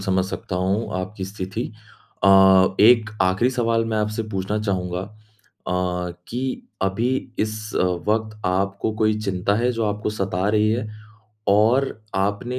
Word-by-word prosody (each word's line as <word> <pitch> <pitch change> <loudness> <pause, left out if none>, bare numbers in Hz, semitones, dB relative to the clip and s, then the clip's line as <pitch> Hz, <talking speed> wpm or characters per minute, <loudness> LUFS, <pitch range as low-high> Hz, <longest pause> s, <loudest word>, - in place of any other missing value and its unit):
समझ 95 -1 +1
सकता 95 -1 -5
हूँ 95 +5 -1
आपकी 95 +1 -5
स्थिति 95 +2 -5 0.6
अ, - - +6 0.5
एक 110 +1 +6
आखिरी 95 +7 +2
सवाल 115 -2 +1
मैं 115 -1 -2
आपसे 105 +1 -1
पूछना 95 +1 -2
चाहूँगा 90 -4 -2
अ, 90 -4 -5 0.2
कि 130 - -3 0.2
अभी 95 +5 0 0.3
इस 110 0 0 0.5
वक़्त 110 0 0
आपको 100 +3 0
कोई 110 0 +2
चिंता 100 -1 0
है 120 +2 +1
जो 115 -1 -1
आपको 105 0 -1
सता 95 -2 -1
रही 105 0 +3
है? 110 0 -1 0.6
और 110 +7 +4 0.3
आपने 105 +6 -1
105 Hz, 140 wpm, -22 LUFS, 95-110 Hz, 0.6 s, अ